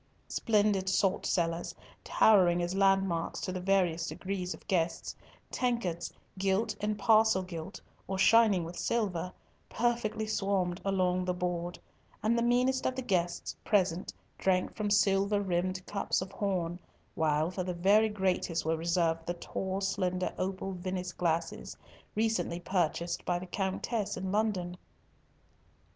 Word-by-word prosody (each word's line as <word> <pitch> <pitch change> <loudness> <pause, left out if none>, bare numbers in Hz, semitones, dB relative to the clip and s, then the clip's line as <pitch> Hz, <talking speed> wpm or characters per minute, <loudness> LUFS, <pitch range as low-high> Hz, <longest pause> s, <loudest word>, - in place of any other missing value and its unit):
Splendid 205 -3 +2
salt 190 0 +1
cellars, 170 -1 -1 0.3
towering 180 -5 +5
as 175 +1 -2
landmarks 195 -3 +2
to 185 - -3
the 185 0 -4
various 180 -3 +1
degrees 185 -1 -4
of - - -19
guests, 170 -3 -1 0.4
tankards, 195 -10 -1 0.3
gilt 195 +3 +1
and 210 0 -1
parcel 215 -1 +4
gilt 170 -3 -7 0.3
or 190 - -2
shining 205 -1 +5
with 170 +2 -7
silver, 190 -6 -1 0.4
perfectly 230 -2 0
swarmed 195 -4 0
along 185 -2 +1
the 180 0 -1
board, 175 -1 -2 0.5
and 220 +2 +3
the 235 - +1
meanest 250 +2 +2
of 255 - -1
the 260 - -3
guests 180 -7 -1
present 185 -3 +1 0.3
drank 185 -1 +1
from 210 -1 -1
silver 200 0 +3
rimmed 185 0 -1
cups 200 - -1
of 185 0 -5
horn, 180 -4 -2 0.3
while 155 +1 +1
for 185 0 -3
the 180 -1 -3
very 205 +5 +4
greatest 185 -5 -1
were 160 0 +2
reserved 165 0 +1
the 175 - -1
tall, 190 +2 -4
slender, 185 -2 -1
opal 190 +1 -2
Venice 185 -1 -4
glasses, 170 -1 -2 0.4
recently 215 -6 0
purchased 175 -1 -1
by 175 - 0
the 180 - -6
Countess 200 +3 -2
in 185 0 -3
London. 195 -4 0
185 Hz, 140 wpm, -31 LUFS, 175-205 Hz, 0.5 s, towering